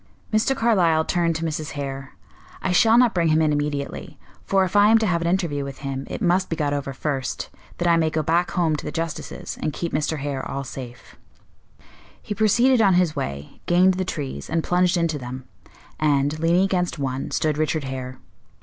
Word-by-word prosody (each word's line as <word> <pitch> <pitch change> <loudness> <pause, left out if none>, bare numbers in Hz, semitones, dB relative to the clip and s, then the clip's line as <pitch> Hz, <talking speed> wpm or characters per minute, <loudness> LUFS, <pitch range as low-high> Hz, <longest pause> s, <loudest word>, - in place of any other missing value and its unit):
Mr. 220 +5 +2
Carlyle 175 -10 +3
turned 170 -2 +1
to 165 +1 -2
Mrs. 155 -1 -4
Hare. 135 -2 -6 0.5
"I 190 - 0
shall 225 +5 +5
not 245 -2 +5
bring 170 -2 +1
him 155 0 +3
in 155 -1 +2
immediately; 145 -1 -3 0.3
for 195 -1 +2
if 185 - -6
I 205 0 +6
am 225 - +6
to 220 - +1
have 170 -4 +1
an 170 - -1
interview 170 -6 0
with 140 -1 -7
him, 135 0 -4
it - - -4
must 185 +1 +2
be 165 - -1
got 145 -3 -1
over 140 -1 -3
first, 135 -2 -3 0.3
that 175 - -1
I 170 -1 +5
may 160 -1 +2
go 155 0 -1
back 170 +3 +1
home 165 -3 +1
to - - -7
the - - -4
justices, 165 -1 -5
and 150 - -1
keep 170 - -4
Mr. 155 +1 0
Hare 140 -2 -3
all 140 - -3
safe." 125 -3 -10 1.0
He 210 - -5
proceeded 235 +4 +3
on 195 -4 +4
his 175 -4 +2
way, 70 +1 -5
gained 180 +2 +5
the 185 +1 -2
trees, 140 - -5
and 165 0 0
plunged 180 0 +2
into 165 -3 0
them; 130 +1 -7 0.6
and, 145 0 +1
leaning 170 +3 +3
against 180 -3 0
one, 135 -1 -3
stood 155 -1 0
Richard 155 0 0
Hare. 130 -1 -6
160 Hz, 205 wpm, -23 LUFS, 140-180 Hz, 1.0 s, I